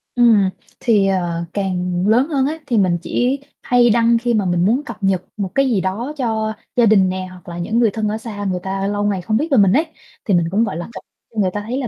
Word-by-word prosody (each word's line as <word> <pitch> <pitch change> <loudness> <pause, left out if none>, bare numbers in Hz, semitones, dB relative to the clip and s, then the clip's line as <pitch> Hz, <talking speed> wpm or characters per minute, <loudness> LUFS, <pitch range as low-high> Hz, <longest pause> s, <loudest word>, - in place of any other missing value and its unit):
Ừm, 225 -6 +4 0.3
thì, 210 -5 +3
ờ, 175 -3 -1
càng 180 -2 -1
lớn 245 +6 +3
hơn 270 -3 +1
á, 315 +3 -3
thì 240 - +1
mình 185 -4 +2
chỉ 250 +8 0 0.2
hay 245 -1 +3
đăng 235 +1 +4
khi 240 +1 -1
mà 210 -4 +1
mình 175 0 +1
muốn 245 +8 +2
cập 215 - -7
nhật 190 -2 +2 0.2
một 195 -2 -2
cái 275 -1 +3
gì 200 - +1
đó 220 +11 -3
cho 220 -4 -1 0.2
gia 240 - +4
đình 200 -4 +4
nè, 185 0 -4
hoặc 180 0 -13
là 170 - -7
những 215 +7 -1
người 230 -3 +3
thân 215 +1 -2
ở 215 +1 -1
xa 215 -2 -7
người 185 -2 -1
ta 195 0 -2
lâu 205 0 -1
ngày 200 -3 0
không 215 +5 0
biết 300 +7 -1
về 270 - +4
mình 200 -3 +5
ấy, 310 +5 +3 0.4
thì 200 - +1
mình 170 -1 +3
cũng, 215 +4 +2
gọi 195 -7 -3
là, 175 - -5
cập 190 - -9 0.3
cho 220 - -4
người 185 -2 +1
ta 205 - -3
thấy 250 - -2
là 265 -3 -2
205 Hz, 270 wpm, -19 LUFS, 185-235 Hz, 0.4 s, mình